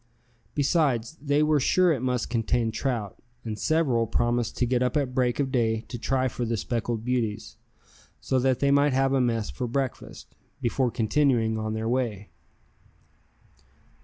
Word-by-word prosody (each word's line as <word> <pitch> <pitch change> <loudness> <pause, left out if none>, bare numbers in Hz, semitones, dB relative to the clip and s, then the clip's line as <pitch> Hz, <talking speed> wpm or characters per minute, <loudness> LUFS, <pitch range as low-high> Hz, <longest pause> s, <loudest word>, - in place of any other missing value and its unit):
Besides, 140 -4 +1
they 145 +1 +2
were 150 -1 +3
sure 180 +6 +3
it 130 - -3
must 125 -3 -1
contain 115 0 0
trout, 110 -3 -3 0.2
and 110 -2 -4
several 130 -8 +1
promised 120 +1 0
to 125 - +2
get 125 0 0
up 125 +4 +1
at 135 -3 -1
break 125 0 +1
of 135 -2 0
day 115 -4 +1
to 120 - -6
try 130 +2 0
for 125 0 -4
the 115 -1 -1
speckled 115 +1 -3
beauties, 120 -4 -2 0.6
so 130 - 0
that 130 0 +1
they 140 0 +3
might 140 0 +4
have 135 +1 +2
a 135 - +3
mess 115 -3 0
for 125 - -4
breakfast, 130 +2 -4 0.3
before 125 +2 0
continuing 115 -1 +1
on 110 0 -3
their 110 0 -3
way. 115 -5 -2
125 Hz, 160 wpm, -26 LUFS, 115-135 Hz, 0.6 s, might